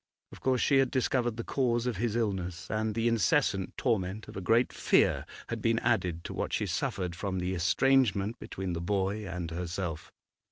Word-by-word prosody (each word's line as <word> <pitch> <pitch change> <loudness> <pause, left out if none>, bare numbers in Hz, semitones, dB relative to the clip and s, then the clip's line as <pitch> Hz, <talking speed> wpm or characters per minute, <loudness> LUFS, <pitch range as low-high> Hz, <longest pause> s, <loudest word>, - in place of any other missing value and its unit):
Of - - -11
course 130 -2 +1
she 135 -2 +4
had 135 -1 +3
discovered 125 -3 0
the 115 - -3
cause 120 -3 0
of 125 -5 -1
his 115 +1 -1
illness, 95 -5 -2
and 110 0 -1
the 115 +1 +1
incessant 115 - +1
torment 105 -3 -1
of - - -10
a 95 - -4
great 115 +7 +3
fear - - +2 0.2
had - - -3
been - - +2
added 85 -2 0
to - - -6
what - - -3
she - - +1
suffered 90 -3 -2
from 95 +1 -3
the 90 +1 -1
estrangement 105 +2 +2
between 95 -2 -4
the 85 - -3
boy 100 +3 -1
and 85 -2 -4
herself. 85 -1 -4
100 Hz, 190 wpm, -30 LUFS, 90-120 Hz, 0.2 s, she